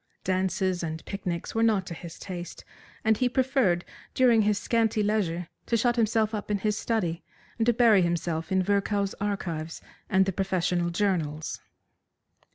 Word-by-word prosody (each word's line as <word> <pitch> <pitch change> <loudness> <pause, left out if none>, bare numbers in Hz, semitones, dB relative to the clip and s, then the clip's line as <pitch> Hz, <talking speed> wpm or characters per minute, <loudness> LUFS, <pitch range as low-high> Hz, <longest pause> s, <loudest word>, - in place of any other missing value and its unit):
Dances 185 0 0
and 160 -1 -5
picnics 180 -4 -4
were 225 - 0
not 215 -4 +3
to 170 - -6
his 170 0 -9
taste, 180 -2 -7 0.4
and 220 -1 +3
he 250 +1 +2
preferred 250 -9 +1 0.3
during 240 -3 +5
his 210 -1 +2
scanty 225 0 +1
leisure 180 -5 0 0.2
to 230 - +2
shut 240 +1 +2
himself 220 -1 +2
up 210 -1 -4
in 205 - +1
his 210 +1 0
study, 185 -7 -1 0.4
and 225 - +1
to 240 - +5
bury 225 -4 +5
himself 170 -1 -1
in 190 0 +3
Virchow's 200 0 0
Archives 170 -6 -3 0.3
and 190 0 +4
the 195 - -1
professional 180 -2 0
journals. 170 -5 -1
195 Hz, 160 wpm, -27 LUFS, 175-220 Hz, 0.4 s, during